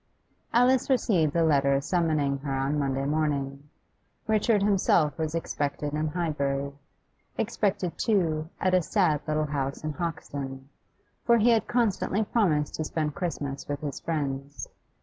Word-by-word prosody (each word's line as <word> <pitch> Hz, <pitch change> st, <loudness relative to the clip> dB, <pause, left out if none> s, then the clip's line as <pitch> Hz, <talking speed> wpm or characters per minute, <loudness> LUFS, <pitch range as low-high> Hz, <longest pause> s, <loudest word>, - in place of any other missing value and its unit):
Alice 250 Hz, +3 st, +3 dB
received 190 Hz, -, +2 dB
the 170 Hz, +2 st, +2 dB
letter 140 Hz, -3 st, +3 dB
summoning 155 Hz, -3 st, 0 dB
her 140 Hz, 0 st, -5 dB
on 135 Hz, +3 st, 0 dB
Monday 135 Hz, -1 st, -1 dB
morning. 145 Hz, -1 st, -1 dB, 0.6 s
Richard 215 Hz, -1 st, +2 dB
himself 180 Hz, -7 st, +3 dB
was 160 Hz, 0 st, -2 dB
expected 145 Hz, -2 st, -2 dB
in 155 Hz, +1 st, 0 dB
Highbury; 140 Hz, -4 st, -1 dB, 0.7 s
expected, 205 Hz, -5 st, -1 dB
too, 165 Hz, -8 st, +1 dB
at 185 Hz, 0 st, +1 dB
a 185 Hz, -, +5 dB
sad 165 Hz, -4 st, +1 dB
little 155 Hz, 0 st, +1 dB
house 140 Hz, -2 st, -3 dB
in 155 Hz, -1 st, -2 dB
Hoxton; 140 Hz, -5 st, -5 dB, 0.5 s
for 235 Hz, -2 st, +5 dB
he 235 Hz, +2 st, +4 dB
had 225 Hz, -1 st, +2 dB
constantly 220 Hz, -3 st, +1 dB
promised 175 Hz, -10 st, +1 dB
to 155 Hz, -, -1 dB
spend 155 Hz, -1 st, -2 dB
Christmas 145 Hz, -6 st, -4 dB
with 145 Hz, -1 st, -3 dB
his 145 Hz, -2 st, -4 dB
friends. 140 Hz, -3 st, -3 dB
155 Hz, 140 wpm, -27 LUFS, 140-185 Hz, 0.7 s, a